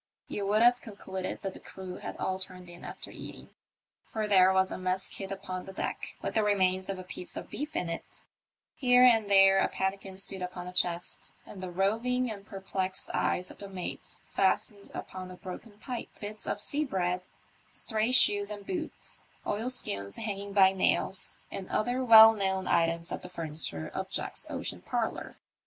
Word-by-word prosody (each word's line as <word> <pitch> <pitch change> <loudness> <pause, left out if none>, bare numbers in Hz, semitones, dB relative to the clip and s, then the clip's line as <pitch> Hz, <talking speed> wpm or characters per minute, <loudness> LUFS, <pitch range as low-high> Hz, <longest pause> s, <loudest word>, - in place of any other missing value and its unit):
You 200 -1 -3
would 215 +3 +4
have 245 +1 +5
concluded 190 -3 -5
that 195 -1 -3
the - - -10
crew 185 -1 -8
had - - -6
all 190 0 -1
turned 180 -1 -8
in 175 - -12
after - - -8
eating; - - -10 0.6
for 220 -1 -2
there 190 -2 +6
was 190 0 +3
a - - -3
mess 185 0 -1
kid 195 -1 -6
upon 185 -1 -5
the 190 - -8
deck - - -4
with - - -2
the 220 - +3
remains 190 -2 +2
of 195 - -2
a 185 - -7
piece 180 0 -8
of - - -7
beef 300 +3 -4
in 180 - 0
it; 165 0 -6 0.5
here 250 -1 +5
and 225 -4 +6
there 195 -1 +7
a - - +3
pannikin 190 0 -3
stood 195 0 0
upon 180 0 -5
a 180 - -7
chest, 175 -1 -1
and 190 - -10
the 185 - -4
roving 225 +7 +1
and 200 -1 -8
perplexed 190 -1 -3
eyes 180 +1 0
of - - -14
the 200 - -8
mate 185 -2 -5
fastened 200 +1 0
upon 185 -1 -6
a 185 - -9
broken 205 +4 -9
pipe, 245 +2 -5
bits 210 +1 -5
of - - -1
sea 285 +8 0
bread, 180 -7 -1 0.4
stray 220 +1 0
shoes 205 -5 +6
and 205 -1 -7
boots, 335 -4 -5 0.2
oilskins 205 - -2
hanging 200 -2 -3
by 195 -1 +6
nails, 190 0 +1
and 190 - -5
other 245 +4 0
well 225 -2 +10
known 190 -2 -1
items 165 0 +2
of - - -3
the 180 - -9
furniture 155 - -5
of - - -3
Jack's - - -1
ocean - - -2
parlour. - - -3
195 Hz, 185 wpm, -30 LUFS, 185-215 Hz, 0.6 s, well